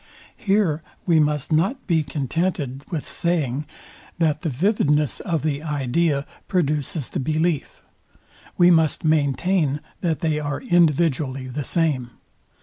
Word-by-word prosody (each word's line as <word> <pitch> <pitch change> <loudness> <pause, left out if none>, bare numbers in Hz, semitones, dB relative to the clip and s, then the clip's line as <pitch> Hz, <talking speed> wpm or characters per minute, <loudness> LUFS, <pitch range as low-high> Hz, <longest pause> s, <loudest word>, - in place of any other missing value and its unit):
Here 195 -6 +1 0.2
we 165 -3 +4
most 150 -1 0
not 195 - +1
be 165 -4 +2
contented 145 -1 -2
with 165 -6 -4
saying, 150 -5 -1 0.5
that 155 -3 +1
the 165 - -1
vividness 150 - +1
of 165 -5 -2
the 150 -2 -1
idea 145 0 0 0.2
produces 150 -4 0
the - - -2
belief: 155 +2 -1 0.7
We 175 0 +6
must 160 -3 +2
maintain 155 +1 +1 0.2
that 165 -4 -1
they 155 -2 +1
are 145 -2 -3
individually 155 - +2
the 145 +3 -3
same. 145 -6 0
155 Hz, 125 wpm, -23 LUFS, 145-170 Hz, 0.7 s, We